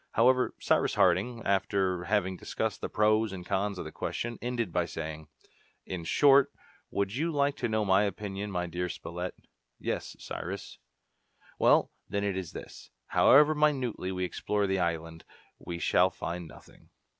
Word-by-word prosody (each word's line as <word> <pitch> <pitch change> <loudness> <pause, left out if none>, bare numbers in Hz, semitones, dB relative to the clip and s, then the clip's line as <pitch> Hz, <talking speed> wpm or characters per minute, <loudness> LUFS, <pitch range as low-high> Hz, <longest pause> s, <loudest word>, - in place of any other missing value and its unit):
However 125 +2 +3
Cyrus - - +1
Harding, 100 +6 +2
after 95 -2 +1
having 95 -1 +1
discussed - - -3
the - - -3
pros 110 0 +2
and 90 -2 -7
cons 100 +1 -1
of - - -5
the 80 - -7
question, 120 +8 -4
ended 120 -5 -2
by 90 -1 +2
saying, 80 -1 -6 0.6
"In 90 -3 -5
short, 140 - +5 0.4
would 100 0 -1
you 165 +5 0
like 145 -2 +1
to 120 - -1
know 110 -1 +1
my 95 0 +4
opinion, 100 0 -4
my 90 -2 -2
dear 90 +1 -3
Spilett?" 90 +2 -5 0.4
"Yes, - - -4
Cyrus." - - -6 0.8
"Well, - - +4 0.2
then, 100 0 -1
it 100 -2 0
is 95 -3 -4
this: - - -10 0.2
however 150 +3 +6
minutely 135 -10 0
we 90 -1 -2
explore 105 +3 -1
the 95 -1 0
island, 80 -1 -2 0.4
we 85 - -6
shall 90 +2 +3
find 85 -1 -5
nothing." - - -17
95 Hz, 155 wpm, -29 LUFS, 90-115 Hz, 0.8 s, however